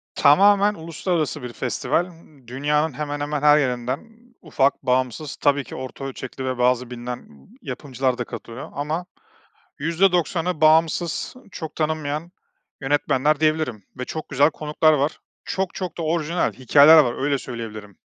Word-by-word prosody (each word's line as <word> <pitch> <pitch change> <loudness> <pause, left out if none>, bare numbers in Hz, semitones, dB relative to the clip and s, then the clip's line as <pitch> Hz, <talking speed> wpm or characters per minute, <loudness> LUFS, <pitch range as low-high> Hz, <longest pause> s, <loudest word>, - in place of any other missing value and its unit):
Tamamen 200 +7 +5
uluslararası 160 -2 -2
bir 125 -1 -6
festival. 130 +7 -1
M 155 -7 -18
dünyanın 145 +4 0
hemen 145 +1 -4
hemen 145 0 -2
her 150 0 +6
yerinden 125 -2 -1 0.4
ufak, 140 -4 0
bağımsız, 130 +3 -1
tabii 145 -1 +2
ki - - -10
orta 130 +1 -7
ölçekli 130 0 -6
ve 130 -1 -2
bazı 125 0 +1
bilinen 125 0 -6
b - - -17 0.3
yapımcılar 130 -2 -2
da 125 - -2
katılıyor 115 +2 -8
ama 155 +5 -3 0.7
%90'ı 175 +1 +1
bağımsız, 160 +5 +2 0.2
çok 160 -4 -7
tanınmayan 155 +1 -2 0.5
yönetmenler 145 +1 +1
diyebilirim 155 -8 0 0.2
ve 125 - -3
çok 155 +4 -6
güzel 145 +2 +3
konuklar 155 +1 +2
var. 145 +1 0 0.3
Çok, 190 -1 -2
çok 180 -3 -5
da - - -2
orijinal 165 +1 0
hikâyeler 145 +5 +7
var, 130 -3 +2
öyle 145 -1 +1
söyleyebilirim. 110 -5 -8
145 Hz, 145 wpm, -22 LUFS, 130-160 Hz, 0.7 s, hikâyeler